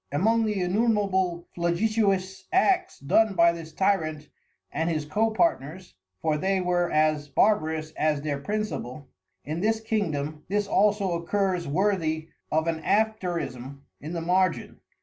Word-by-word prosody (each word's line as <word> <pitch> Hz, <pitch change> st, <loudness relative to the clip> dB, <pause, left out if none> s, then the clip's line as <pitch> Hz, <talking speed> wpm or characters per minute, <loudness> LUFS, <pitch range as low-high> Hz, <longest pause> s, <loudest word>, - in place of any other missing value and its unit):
Among 225 Hz, +10 st, +2 dB
the 210 Hz, -2 st, -1 dB
Innumerable 190 Hz, -3 st, +1 dB
Flagitious 190 Hz, +1 st, 0 dB
Acts 370 Hz, -1 st, +2 dB
done 200 Hz, +9 st, +2 dB
by 170 Hz, -1 st, +5 dB
this 165 Hz, -1 st, -8 dB
Tyrant 155 Hz, -5 st, 0 dB, 0.4 s
and 165 Hz, +1 st, -1 dB
his 155 Hz, -3 st, -1 dB
Co 215 Hz, +9 st, +1 dB
partners 185 Hz, -, -1 dB, 0.3 s
(for 155 Hz, -2 st, +1 dB
they 190 Hz, +3 st, +1 dB
were 180 Hz, -1 st, +1 dB
as 155 Hz, -1 st, +2 dB
Barbarous 155 Hz, -3 st, +1 dB
as 150 Hz, -2 st, 0 dB
their 145 Hz, -2 st, -2 dB
Principal) 150 Hz, -, -4 dB, 0.4 s
in 155 Hz, +3 st, -3 dB
this 220 Hz, +3 st, +1 dB
Kingdom, 155 Hz, -, -2 dB
this 205 Hz, +1 st, 0 dB
also 205 Hz, -1 st, +2 dB
occurs 180 Hz, +1 st, -1 dB
worthy 160 Hz, -2 st, 0 dB, 0.2 s
of 160 Hz, +1 st, +1 dB
an 165 Hz, -1 st, -1 dB
Afterism 170 Hz, -, -1 dB, 0.2 s
in 155 Hz, +4 st, -7 dB
the 170 Hz, -, -3 dB
Margin. 180 Hz, +1 st, 0 dB
175 Hz, 135 wpm, -26 LUFS, 155-205 Hz, 0.4 s, by